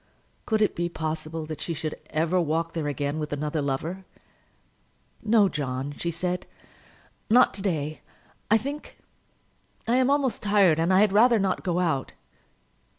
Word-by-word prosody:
Could 220 -1 +2
it 210 - +1
be 175 0 -1
possible 160 0 -4
that 155 -1 -7
she 165 - -3
should 155 0 -3 0.2
ever 165 +3 +1
walk 165 +1 -1
there 160 -3 -2
again 145 +1 -2
with 150 -1 -4
another 150 +1 -2
lover? 155 +7 -3 1.2
"No, 215 -2 +4
John," 140 -3 -3
she 170 - -3
said; 180 +2 -2 0.8
"not 245 +3 +5
to 195 - -4
day, 155 -6 -2 0.5
I 220 - +6
think. 280 +6 -6 0.9
I 240 +2 +3
am 260 0 +3
almost 275 -5 +1
tired, 200 -6 +4
and 165 +3 +2
I 185 +1 +5
had 210 -2 +3
rather 230 +3 +6
not 195 -3 0
go 175 -2 -1
out." 160 -7 0
170 Hz, 155 wpm, -26 LUFS, 155-205 Hz, 1.2 s, I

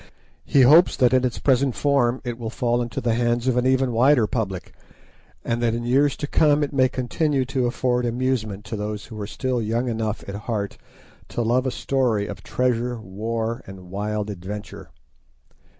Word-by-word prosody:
He 140 - +4
hopes 155 +8 +6
that 125 -2 +4
in 130 0 +4
its 125 -2 -1
present 135 -2 +2
form 130 +1 +1
it 120 -1 -5
will 115 -2 -4
fall 120 +1 0
into 120 -1 -3
the 115 -1 +1
hands 120 +1 0
of 130 - +2
an 125 +1 +2
even 130 -1 +2
wider 125 +1 +4
public, 100 -5 -3 0.7
and 120 0 -1
that 115 -1 +1
in 120 - -3
years 135 +4 +2
to 145 - -3
come 150 0 +3
it 145 - -3
may 130 -2 +3
continue 135 +2 0
to 130 -1 0
afford 125 0 0
amusement 115 -4 -2
to 115 - -5
those 105 0 -4
who 110 -2 -8
are 100 - -4
still 125 +2 -2
young 115 +3 -1
enough 110 -2 -3
at 100 - -5
heart 105 -1 -4 0.5
to 120 - -2
love 125 +3 +1
a - - +2
story 125 -8 0
of 100 -2 -7
treasure, 120 +2 -1
war, 110 +4 -3
and 95 -2 -11
wild 105 +1 -2
adventure. 100 +2 -8
120 Hz, 185 wpm, -23 LUFS, 110-130 Hz, 0.7 s, hopes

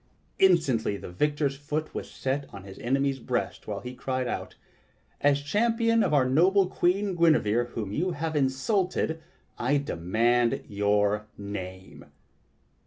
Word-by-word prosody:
Instantly 140 - +3
the - - -9
victor's 145 - 0
foot 150 +2 -4
was - - -5
set 135 +1 -3
on 100 -1 -9
his 95 -1 -11
enemy's 135 +3 0
breast, - - -3
while - - -4
he 125 0 -7
cried 130 0 -2
out: - - -4 0.7
"As 145 0 +3
champion 230 +7 +2
of - - +1
our 140 -3 +4
noble 185 +9 +4
Queen 190 +2 0
Guinevere 120 -9 +3
whom 105 -4 -4
you 175 - -1
have 160 0 -3
insulted, 160 +4 0 0.4
I 140 +4 +2
demand 115 +1 +1
your 105 +1 +1
name!" 95 -2 -7
135 Hz, 135 wpm, -27 LUFS, 110-165 Hz, 0.7 s, our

